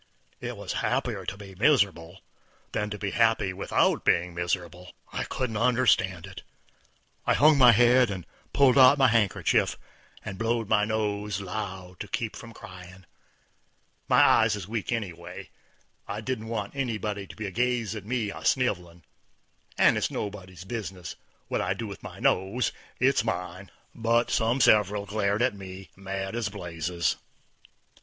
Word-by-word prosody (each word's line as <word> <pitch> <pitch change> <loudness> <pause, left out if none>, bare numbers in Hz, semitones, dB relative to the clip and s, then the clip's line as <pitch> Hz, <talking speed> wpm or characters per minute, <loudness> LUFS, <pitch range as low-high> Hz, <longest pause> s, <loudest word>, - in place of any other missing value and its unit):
It - - -6
was - - -5
happier - - -1
to 95 - -4
be 100 -1 -11
miserable 95 - +1 0.5
than 105 0 -2
to 105 - -5
be 100 -1 -3
happy 115 -5 +2
without 95 - +1
being 90 +1 +2
miserable. 85 +1 -4 0.2
I - - -2
couldn't 115 -4 -3
understand 110 -7 +2
it. - - -10 0.9
I - - +4
hung 150 0 +5
my 125 -2 +9
head 120 +1 +5
and 95 -4 -5 0.3
pulled 140 -1 +5
out 130 +2 +8
my 135 -2 +5
handkerchief, 110 -5 +2 0.5
and 100 -3 -6
blowed 115 -1 0
my 105 -1 +3
nose 105 -2 -2
loud 95 -2 -6
to 105 - -6
keep 110 +2 -3
me - - -9
from 115 - -10
cryin'. 95 -3 -12 1.0
My - - +5
eyes - - +4
is 100 -3 -7
weak 110 +1 -3
anyway; 90 -8 -5 0.6
I 105 - -4
didn't 110 0 -4
want 110 0 -4
anybody 110 -6 -3
to - - -11
be 110 - -5
a 95 - -4
gazin' 120 -1 -1
at 100 - -16
me 120 -5 -1
a - - -8
sniv'lin', 90 - 0 0.7
and - - +5
it's - - 0
nobody's 95 -4 -6
business 95 -4 -6 0.3
what - - -1
I - - -1
do - - -5
with - - -8
my - - -9
nose. 95 +7 +1 0.3
It's 130 0 +3
mine. 90 -2 -4 0.2
But 115 +1 +1
some 115 +4 +1
several 105 -2 +4
glared 100 +2 0
at 130 - +2
me 95 -1 -10
mad 95 +1 -5
as 115 -3 -1
blazes. 85 -3 -2
105 Hz, 160 wpm, -27 LUFS, 95-115 Hz, 1.0 s, my